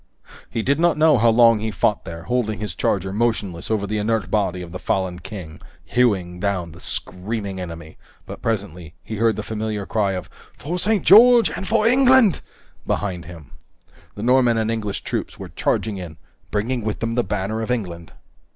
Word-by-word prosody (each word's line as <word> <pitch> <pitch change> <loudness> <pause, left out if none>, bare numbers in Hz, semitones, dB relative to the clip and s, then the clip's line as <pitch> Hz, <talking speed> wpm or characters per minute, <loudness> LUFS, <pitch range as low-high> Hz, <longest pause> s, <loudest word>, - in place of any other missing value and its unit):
He 115 - -2
did 140 +5 +1
not 170 -1 +3
know 155 -4 +5
how 115 +1 +5
long 115 -1 +5
he 110 +1 -2
fought 105 -1 0
there, 85 0 -7
holding 115 -1 -1
his 105 0 -4
charger 95 0 -1
motionless 100 -6 -1
over 110 -2 0
the 105 +1 -2
inert 110 -3 -1
body 95 -4 0
of 85 - -10
the 90 - -6
fallen 95 -2 -1
king, 90 -6 -9 0.2
hewing 95 -8 +1
down 90 -4 -2
the 85 - -13
screaming 100 0 -5
enemy, 85 -2 -9 0.3
but - - -9
presently 90 -7 -3
he 110 - -6
heard 115 0 +2
the - - -4
familiar 110 -2 -3
cry 100 -2 0
of 90 - -5 0.3
"For 170 +6 -4
St. 210 +1 +1
George 235 +4 +7
and 190 - -5
for 220 -1 +2
England" 255 -4 +5 0.5
behind 90 -5 -2
him. 80 -3 -12 0.6
The 105 - -6
Norman 125 -1 +4
and 110 0 0
English 105 -3 -3
troops - - -4
were - - -8
charging 105 -2 -1
in, 85 -4 -8 0.3
bringing 115 +3 -1
with 110 -1 -3
them 115 0 -2
the 120 +1 +1
banner 105 +2 -2
of 110 - -4
England! 90 -9 -3
105 Hz, 185 wpm, -22 LUFS, 90-120 Hz, 0.6 s, George